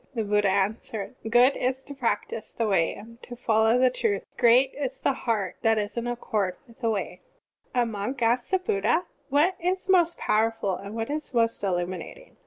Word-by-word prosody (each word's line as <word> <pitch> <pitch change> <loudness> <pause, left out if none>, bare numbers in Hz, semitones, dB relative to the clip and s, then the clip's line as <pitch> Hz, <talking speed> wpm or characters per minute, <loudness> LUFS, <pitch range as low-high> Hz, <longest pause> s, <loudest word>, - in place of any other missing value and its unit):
The 225 - 0
Buddha 205 -1 +2
an 200 +3 +1
swered: 220 0 -6 0.2
"Good 245 +4 +5
is 260 +1 -1
to 285 - -8
practise 230 -4 -3
the 230 - -1
Way 190 -6 +1
and 230 +4 -13
to 245 - -9
follow 225 -1 +3
the 255 0 +4
truth. 410 - -1
Great 250 +2 +4
is 275 -2 -4
the 275 - +1
heart 220 -7 -2
that 225 -2 +3
is 205 0 -2
in 235 0 -2
accord 215 -6 -1
with 230 - -19
the 230 -3 0
Way." 190 -4 -3 0.5
(15) 245 - +4
A - - -1
monk 225 +3 -4
asked 240 +2 +2
the 380 - +3
Buddha: 345 - 0 0.2
"What 310 +7 +3
is 370 +2 -1
most 345 -3 +3
powerful, 220 -2 +1
and 200 +3 -8
what 225 +4 -3
is 300 -3 -4
most 230 -1 +2
illuminat 185 - -3
ing?" - - -19
230 Hz, 200 wpm, -26 LUFS, 210-265 Hz, 0.5 s, Good